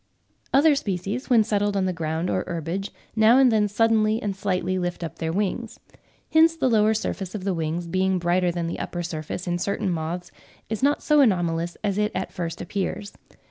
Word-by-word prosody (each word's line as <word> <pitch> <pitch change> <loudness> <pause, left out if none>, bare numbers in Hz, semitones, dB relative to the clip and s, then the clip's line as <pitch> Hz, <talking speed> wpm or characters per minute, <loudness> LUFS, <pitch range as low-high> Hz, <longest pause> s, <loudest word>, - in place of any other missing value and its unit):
Other 295 +3 +5
species, 205 +1 -3
when 235 -4 +5
settled 205 -1 0
on 190 - +1
the 185 - 0
ground 165 +1 -2
or - - 0
herbage, 175 +3 -3 0.3
now 220 +3 +6
and 265 -2 +6
then 215 -2 +3
suddenly 220 +1 +2
and 205 -3 -3
slightly 185 -1 -1
lift 175 -1 -3
up 165 - -6
their 160 -1 -1
wings. 210 +5 -2 0.5
Hence 325 +1 +6
the 260 -6 +1
lower 215 0 +4
surface 195 -2 -3
of 200 - -5
the 195 -1 0
wings 165 +1 -2
being 185 +2 +1
brighter 175 +1 +1
than 170 -1 -3
the 165 - -4
upper 175 0 -4
surface 165 +1 -5
in 175 -1 -1
certain 200 +1 -1
moths 170 +2 -4 0.4
is 220 - -2
not 285 +2 +2
so 300 -1 +4
anomalous 175 -7 +1
as 205 -1 0
it 210 0 +1
at 190 - -3
first 170 -1 -4
appears. 200 +1 -4
190 Hz, 195 wpm, -24 LUFS, 175-215 Hz, 0.5 s, now